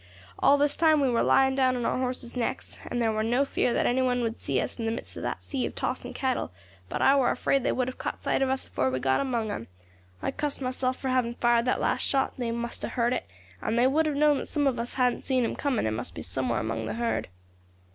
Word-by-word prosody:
All 285 - +5
this 290 0 +2
time 315 -2 +4
we 270 -3 +2
war 235 - +2
lying 265 0 +4
down 260 -1 +2
on 240 -2 -2
our - - 0
horses' 250 -1 -3
necks, 245 -2 -3
and 245 - -2
there 225 -2 +2
war 215 0 -1
no 240 +5 +2
fear 250 - 0
that - - +1
any 255 +2 +2
one 250 -1 +1
would 230 0 -2
see - - 0
us - - -4
in 225 - -2
the - - +1
midst 230 - -6
of - - -6
that - - -3
sea 270 -3 -3
of - - -9
tossing 250 0 -3
cattle; 255 - -1 0.4
but - - -1
I 275 - +6
war 265 -3 +3
afraid 275 - +1
they - - +1
would 255 -1 0
have 255 - -6
caught - - -4
sight - - +1
of 270 - +2
us 265 0 -1
afore 130 - 0
we 130 0 -1
got 130 0 +2
among 235 -6 -1
'em. 115 - -5 0.5
I - - -2
cussed 295 +1 -3
myself 255 0 -1
for 265 - -3
having 250 -2 +1
fired 240 -1 +3
that 255 - +1
last - - +1
shot; 270 -1 +1
they 240 -2 -1
must 235 0 -4
have - - -4
heard 240 0 +1
it, 255 - -3 0.3
and 240 +4 +2
would 315 +1 +3
have 300 - -1
known 295 -1 +4
that - - -6
some 295 -2 0
of 260 -4 +1
us 235 +1 -4
hadn't 250 -2 +2
seen 260 -2 +1
them 230 - -1
coming, 275 - 0
and 110 0 0
must 120 - -6
be - - -6
somewhere 125 -3 -1
among 110 0 -3
the 110 - -3
herd. 115 -1 -1
250 Hz, 270 wpm, -27 LUFS, 230-265 Hz, 0.5 s, I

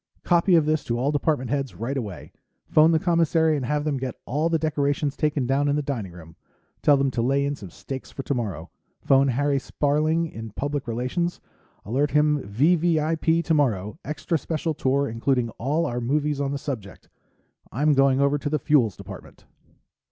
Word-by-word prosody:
"Copy 175 +1 +3
of 160 -3 +4
this 155 0 +1
to 120 - -1
all 135 +4 0
department 145 -4 0
heads, 135 -8 -2
right 115 +9 -3
away. 100 - -6 0.4
Phone 155 +1 +5
the 160 - +4
commissary 165 -1 +2
and 140 - -2
have 150 0 0
them 150 -2 -1
get 130 -2 -4
all 150 +6 0
the 165 - +2
decorations 145 -2 -1
taken 150 -3 0
down 135 +3 +1
in 145 - +2
the 150 - -1
dining 120 -10 -4
room. 80 -2 -13 0.5
Tell 145 -1 +5
them 135 -1 +1
to 120 - -1
lay 135 +3 +1
in 145 0 -1
some 100 -8 -10
steaks 130 +9 -8
for 135 - -7
tomorrow. 100 - -3 0.3
Phone 135 0 +4
Harry 140 +2 +1
Sparling 155 +5 0
in 115 -8 -7
Public 145 +1 -3
Relations 130 +10 -2 0.5
alert 135 +8 0
him 150 0 +2
V.V.I.P. 160 - +1
tomorrow, 130 - 0
extra 155 +2 -2
special 160 +1 -2
tour 140 0 0
including 115 +1 0
all 150 +7 0
our 120 -4 -2
movies 145 +3 0
on 140 -1 -1
the 140 - -2
subject. 115 -9 -7 0.6
I'm 150 +4 +2
going 135 -1 +3
over 140 +1 +2
to 145 - -3
the 155 - +1
Fuels 125 -8 +2
Department." - - -11
140 Hz, 180 wpm, -24 LUFS, 125-155 Hz, 0.6 s, Phone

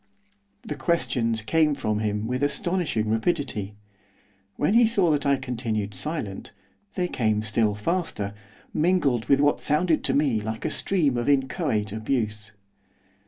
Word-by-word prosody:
The - - -4
questions 125 -7 0
came 150 +5 +2
from 110 -6 -1
him 105 0 -1
with 125 +3 -2
astonishing 170 - 0
rapidity. 110 - -1 0.8
When 150 +7 +1
he 235 0 +6
saw 195 -7 +3
that 145 -1 +1
I 140 - +4
continued 115 -6 -3
silent, 105 - -4 0.4
they 180 -2 0
came 110 -7 0
still 110 -1 +1
faster, 105 - -2 0.4
mingled 150 -9 +1
with 140 - +5
what 145 0 +2
sounded 155 +2 +2
to 135 - +1
me 140 -7 +2
like 110 +1 -5
a - - 0
stream 150 -10 0
of 120 +3 0
inchoate 135 - 0
abuse. 110 -1 -2
130 Hz, 140 wpm, -25 LUFS, 110-155 Hz, 0.8 s, he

